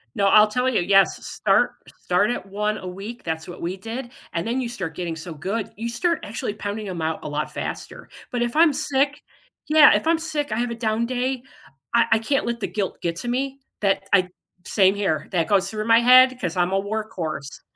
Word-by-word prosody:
No, 200 -1 +2
I'll 215 +1 +7
tell 250 +4 0
you, 225 - +1
yes, 195 +2 +3
start - - +2 0.3
start 180 +5 +2
at 190 - -4
1 210 +2 -2
a 185 - -8
week, 200 +6 -8
that's 160 -1 -4
what 175 - -9
we 180 +3 -3
did, 235 +5 -6 0.2
and 170 +4 -2
then 250 +3 0
you 245 - -2
start 185 -9 -5
getting 170 -2 -3
so 165 +1 -8
good, 195 +8 -4
you 230 +1 -3
start 335 +8 0
actually 205 -1 -4
pounding 205 0 -5
'em 170 -3 -5
out 160 0 -1
a - - -5
lot 150 +1 -3
faster, - - -6 0.2
but 245 -1 -2
if 240 +3 -1
I'm 320 -2 +5
sick 285 0 0 0.5
yeah, 310 -1 +8
if - - -1
I'm 330 0 +4
sick, 310 -5 -3
I 215 - -1
have 240 0 -1
a - - -3
down 225 0 0
day, 255 +1 -2 0.5
I 235 - +5
I 225 - +3
can't 270 +5 0
let 235 0 -2
the - - -2
guilt 200 -3 -3
get 170 -1 -2
to 240 - -6
me, 270 +2 -2 0.2
that 195 -1 +1
I 185 -2 +4 0.4
Same 195 -1 +3
here, 160 -7 -1
that 165 -3 +1
goes 195 -1 +2
through 215 0 -3
my 230 0 +6
head 255 +1 +7
'cause 180 -1 -3
I'm 175 +1 +2
a 195 - +2
workhorse, 185 -9 -5
215 Hz, 225 wpm, -23 LUFS, 185-245 Hz, 0.5 s, yeah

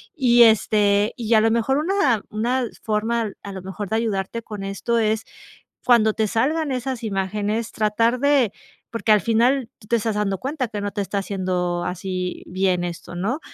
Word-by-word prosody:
y 240 -5 +6
este, 210 -1 +3
y 230 -1 -1
a 215 - +6
lo 225 - +3
mejor 235 +4 +1
una 300 - +1
una 240 +5 0 0.2
forma 220 0 0
a 200 - -7
lo 190 - -7
mejor 190 +1 -6
de 220 - +1
ayudarte 225 0 -2
con 210 -2 -7
esto 200 +4 -1
es 220 0 +1 0.6
cuando 220 -3 +4
te 220 - +1
salgan 290 +7 0
esas 255 -1 -3
imágenes 210 +2 -2
tratar 230 +3 +1
de 280 -6 +3 0.4
porque, 230 -1 -2
al 210 - +5
final, 235 +4 +2
tú 210 - -17
te 235 - +3
estás 225 -1 -1
dando 195 -2 0
cuenta 265 - -3
que 210 -2 -5
no 205 0 -3
te 205 - -2
está 200 +1 -3
haciendo 180 -3 -2
así 185 0 -4
bien 185 -1 0
esto 175 0 -6
¿no? 200 +8 -1
O - - -12
220 Hz, 185 wpm, -22 LUFS, 195-235 Hz, 0.6 s, y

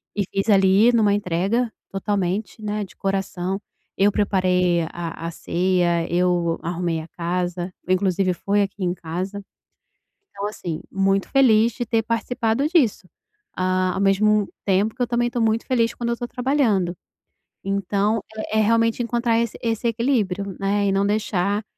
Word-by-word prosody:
e 205 - +1
fiz 195 +3 -1
ali 195 +3 +5
numa 215 -4 +3
entrega 205 +5 0 0.2
totalmente, 195 +2 -2
né, 210 0 -2
de 190 - -12
coração, 195 0 -2 0.3
eu 205 +1 +3
preparei 180 -4 +2
a 165 -1 -5
a - - -4
ceia, 175 -1 0
eu 175 -1 +1
arrumei 170 -1 -2
a 160 - -10
casa, 175 +1 -3 0.2
inclusive 185 0 +1
foi 205 +3 0
aqui 195 0 -5
em 175 -1 +1
casa, 185 +4 -5 0.9
então, 200 +1 -5
assim, 170 -6 -5
muito 195 0 +1
feliz 235 -4 +4
de 240 - -4
ter 225 -1 +1
participado 230 +3 0
disso, 255 - +2 0.5
ah, 185 0 +1
ao 195 - -2
mesmo 205 +1 +3 0.2
tempo 200 +3 +1
que 250 - -3
eu - - +2
também 240 0 0
tô 240 - -2
muito 225 0 +1
feliz 235 -3 +1
quando 235 -1 -3
eu 235 - 0
tô 240 - -4
trabalhando. 240 -10 +1 0.7
Então 200 +2 0 0.3
é 220 - +3
é - - +5
realmente 230 +2 +2
encontrar 235 0 +1
esse 235 -1 -2
esse 230 0 -1
equilíbrio, 210 -6 0
né, 200 +1 +1
e - - +2
não 195 +1 +2
deixar 205 -1 0
200 Hz, 155 wpm, -22 LUFS, 185-225 Hz, 0.9 s, ali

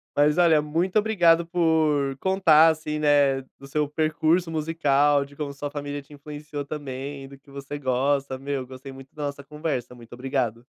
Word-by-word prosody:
Mas 150 +3 +3
olha, 165 -4 +5
muito 170 +7 0
obrigado 170 -6 +3
por 155 -5 +1
contar 165 -4 +5
assim, 155 -1 -2
né, 145 -2 +3 0.2
do 135 - -13
seu 150 +1 -1
percurso 160 +3 +1
musical, 145 -3 +2
de 140 +1 -15
como 145 -1 -5
sua 145 +1 -5
família 145 -1 -5
te 140 - -23
influenciou 145 0 -7
também, 140 -1 -6
do 140 - -13
que 140 +1 -24
você 140 +1 -7
gosta, 135 +1 0
meu, 135 -1 -4
gostei 130 +1 -10
muito 135 0 -13
da 150 - -4
nossa 140 0 -7
conversa, 145 -5 -4
muito 120 -1 -14
obrigado. 125 -3 -2
145 Hz, 175 wpm, -25 LUFS, 135-155 Hz, 0.2 s, olha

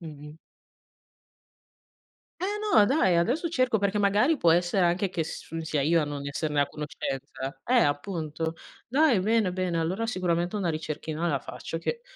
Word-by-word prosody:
mh-mh. 150 -2 -10 2.0
Eh 365 - 0 0.3
no, 210 -3 +7
dai, 205 - +3
adesso 250 - +1
cerco 255 -8 +1
perché 200 +1 0
magari 210 +10 +3
può 170 -9 +4
essere 175 +2 +2
anche 180 +3 +1
che 170 -2 -2
s 165 +1 -7
sia 155 -2 -1
io 165 +4 +3
a - - +1
non 145 -1 -5
esserne 145 +1 0
a 140 - +1
conoscenza. 135 -2 -5
Eh, 245 - 0
appunto. 160 0 -2 0.3
Dai, 270 -3 +3
bene, 215 -1 +2
bene, 180 -2 -1
allora 185 +8 -1
sicuramente 175 -4 -1
una 195 -4 0
ricerchina 155 +1 -3
la 145 -5 0
faccio 165 +5 -6
che 470 - -3
175 Hz, 160 wpm, -27 LUFS, 155-205 Hz, 2.0 s, no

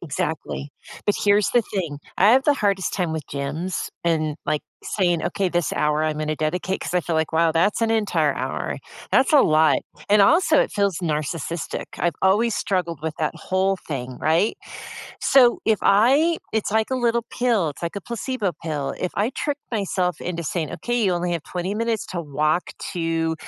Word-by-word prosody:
Exactly, 145 -2 -4 0.4
but 205 - +2
here's 205 0 +3
the 240 - +3
thing, 160 -7 -2 0.2
I 200 +4 +6
have 265 +2 +5
the 295 - +4
hardest 200 -6 0
time 180 -4 -1
with 155 -4 -4
gyms 145 +6 -3 0.2
and, 155 -3 0
like, 150 -1 +1 0.2
saying, 175 -5 0
"Okay, 195 -2 0
this 175 -1 -1
hour, 150 +1 +1
I'm 155 -1 -1
gonna 155 0 -2
dedicate" 180 +4 -1
'cause - - -4
I 180 - +3
feel 165 -1 -2
like, 160 0 0
"Wow, 165 0 +3
that's 180 +8 +1
an 225 - +2
entire 220 -2 +2
hour," - - -3 0.3
that's 265 - +3
a 290 - +8
lot, 155 -1 +4 0.3
and, 205 0 +6
also, 315 - +5
it - - 0
feels 200 -4 0
narcissistic. 160 0 -3
I've 170 -3 0
always 210 +4 +3
struggled 170 -5 -1
with 160 -1 -3
that 155 - -1
whole 190 +1 0
thing, 130 -4 -4
right? 165 +7 +2 0.6
So 255 -3 +5
if 220 -2 +3
I 275 +11 +4
it's 220 -2 0
like 220 +3 +1
a - - +1
little 235 -2 +1
pill, 230 -10 +1
it's 145 - -13
like 170 +3 -3
a - - -3
placebo 235 -2 -3
pill, 145 -4 -3
if 180 - -1
I 215 +5 +1
trick 290 +1 -3
myself 185 -5 -1
into 170 -1 -4
saying, 160 0 -2
"Okay, 240 -1 -1
you 190 -3 +3
only 175 0 -1
have 170 -3 -2
20 180 +4 -4
minutes 230 -1 -1
to 175 - -4
walk 155 +3 0 0.2
to, 165 -1 -1
180 Hz, 190 wpm, -23 LUFS, 160-215 Hz, 0.6 s, a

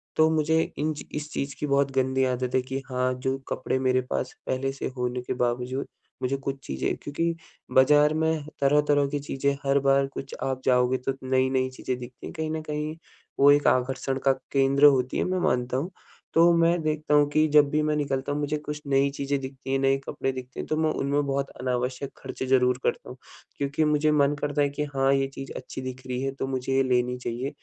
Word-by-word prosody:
तो 155 0 +5
मुझे 160 0 +2 0.2
इन 155 +1 0 0.2
इस 150 0 -5
चीज़ 140 0 -3
की - - -1
बहुत 140 0 +2
गंदी 130 0 +1
आदत 125 0 -1
है 130 - +4
कि, 135 +1 -4
हाँ, 130 0 +1
जो 130 +1 -2
कपड़े 130 - -1
मेरे 130 0 +2
पास 130 - -2
पहले 135 +1 -1
से 135 - -4
होने 125 0 -2
के 125 - -3
बावजूद, 125 +2 -1 0.3
मुझे 130 +2 0
कुछ 135 0 -4
चीज़ें 65 -1 -2
क्योंकि 165 +4 -2 0.4
बाज़ार 150 +3 +6
में 160 -1 0 0.2
तरह-तरह 145 0 +3
की 145 0 -2
चीज़ें 140 0 -1
हर 135 +1 +3
बार 135 0 +4
कुछ 135 0 -7
आप 130 -1 -2
जाओगे, 125 0 +3
तो 130 +2 -2
नई-नई 130 0 +1
चीज़ें 130 -1 -4
दिखती 125 0 -10
हैं, - - -8
कहीं 160 -1 -3
न 160 0 -2
कहीं, 150 0 -4 0.4
वो 140 +1 +7
एक 145 0 +4
आकर्षण 130 +1 +1
का 135 - +6 0.2
केंद्र 140 +1 +4
होती 130 -3 +4
है, - - +1
मैं 185 0 -1
मानता 125 -5 0
हूँ। 165 +8 -3 0.4
तो 170 +1 +6
मैं 170 0 +3
देखता 155 -1 -1
हूँ 145 0 +5
कि 155 +1 +3
जब 150 -1 +6
भी 150 +1 +1
मैं 150 0 +1
निकलता 140 -1 -1
हूँ, 145 - -1
मुझे 150 +1 -1
कुछ 150 0 -6
नई 140 0 +3
चीज़ें 140 0 -1
दिखती 135 0 -7
हैं, 135 - +2
नए 135 0 +3
कपड़े 135 - -2
दिखते 130 0 -8
हैं, - - -3
तो 155 - -1
मैं 160 0 +2
उनमें 145 0 0
बहुत 140 0 -1
अनावश्यक 125 +2 -2
खर्चे - - -6
ज़रूर 125 -1 +3
करता - - -1
हूँ 125 - -9 0.4
क्योंकि 140 +2 0
मुझे 150 0 +2
मन 145 -1 +3
करता 145 0 0
है 145 - +3
कि 145 +1 -3
हाँ 135 0 +3
ये 135 0 +1
चीज़ 135 0 -7
अच्छी - - -7
दिख 130 0 -6
रही 125 0 -2
है, 135 0 -1
तो 135 0 -4
मुझे 130 0 -2
ये 135 - +4
लेनी 125 -1 +1
चाहिए 125 +2 -3
135 Hz, 215 wpm, -26 LUFS, 130-150 Hz, 0.4 s, वो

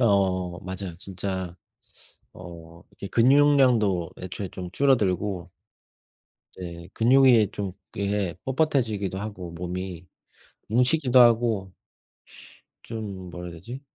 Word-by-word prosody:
어 120 - +4 0.4
뭐 90 - -9
맞아요. 95 -2 -6
진짜 95 -2 -5 0.8
어 85 -2 -12
이렇게 100 - -9
근육량도 120 - +4
애초에 95 +1 -5
좀 90 -1 -7
줄어들고 100 -8 +1 1.1
이제 85 -1 -8
근육이 120 -3 +5
좀 100 -2 -4 0.2
이게 100 -3 -1
뻣뻣해지기도 120 - 0
하고 100 -4 -6
몸이 90 0 -5 0.6
뭉치기도 125 +2 +4
하고 115 -5 +3 1.1
좀 100 -5 -6
뭐라 90 0 -7
해야 85 - -9
되지? 120 +10 -8
100 Hz, 230 characters per minute, -25 LUFS, 90-120 Hz, 1.1 s, 근육이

